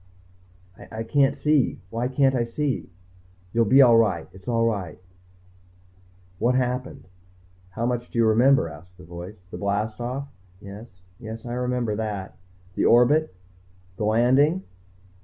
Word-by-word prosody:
"I 110 0 -4
can't 135 +3 +2
see. 150 -2 +1
Why 115 +2 -1
can't 135 +1 +2
I 125 -2 +1
see?" 135 +4 -3 0.6
"You'll 115 0 +3
be 135 +6 +7
all 120 -2 +6
right. 95 -8 +1
It's 95 +1 -16
all 115 -1 +1
right." 100 -8 -2 1.4
"What 125 +2 +2
happened?" 125 0 -2 0.6
"How 110 +6 -3
much 120 0 -2
do - - -7
you 115 - +4
remember?" 120 0 +4
asked 85 +4 -13
the 90 - -14
voice. 90 +3 -10
"The - - -7
blast 105 +2 -2
off?" 130 +4 -4 0.3
"Yes 100 -2 -12 0.2
yes, 110 -1 -8
I 120 - -5
remember 125 -3 -1
that." 105 -4 -4 0.4
"The - - 0
orbit? 125 +1 +4 0.6
The 105 - -2
landing?" 130 - +3
115 Hz, 140 wpm, -24 LUFS, 105-125 Hz, 1.4 s, be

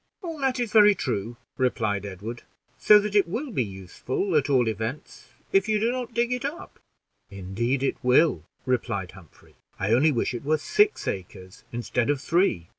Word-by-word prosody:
"All 330 -3 -6
that 265 -2 0
is 235 -3 -2
very 210 -2 +7
true," 120 - -3 0.2
replied 110 -6 0
Edward; 105 +5 -7 0.4
"so 210 - +7
that 210 0 -1
it 205 - +4
will 245 - -4
be 130 - 0
useful 105 - -4
at 145 -1 +2
all 130 -4 +3
events, 110 +6 -5 0.2
if 390 - +2
you 215 -1 +2
do 230 +3 +1
not 250 -2 -5
dig 240 +1 +1
it 250 - -3
up." 290 +5 -6 0.5
"Indeed 110 +8 -2
it 140 - 0
will," 130 +6 +3 0.2
replied 115 -7 -2
Humphrey; 90 -7 -18 0.2
"I 95 +3 -1
only 145 +6 +4
wish 125 -1 -1
it 120 - -5
were 155 +2 +1
six 415 - +1
acres 95 0 -7
instead 120 +1 -1
of 145 -2 +1
three." 155 - +1
130 Hz, 180 wpm, -25 LUFS, -, 0.5 s, very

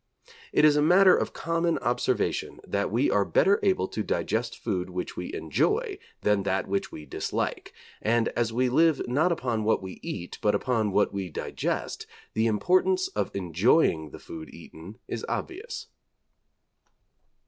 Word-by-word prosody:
It - - +4
is 150 -1 +6
a 150 - +3
matter 180 +4 +6
of - - -1
common 165 0 0
observation 120 - -1
that 100 0 -1
we 120 +7 +1
are 105 - +3
better 195 - +3
able 190 - +2
to - - -3
digest - - -1
food 90 0 -2
which 90 0 -5
we - - -5
enjoy - - 0 0.2
than 105 -1 +2
that 95 0 -1
which 100 0 -2
we 75 - -9
dislike, - - -3 0.3
and 115 +1 +2
as 120 -1 -1
we 125 +3 +1
live 155 +4 +3
not 150 +9 +2
upon 120 -9 -1
what 110 -2 +1
we 95 -1 -8
eat, 90 -3 -6
but 105 -1 +3
upon 110 -1 0
what 100 +2 +2
we 95 -2 -3
digest, - - -3 0.3
the 110 +1 +2
importance 185 - +2
of - - -2
enjoying 90 - +2
the - - -10
food 80 -1 -9
eaten 90 +8 -12
is 115 - -4
obvious. 455 +5 -4
115 Hz, 160 wpm, -27 LUFS, 100-165 Hz, 0.3 s, is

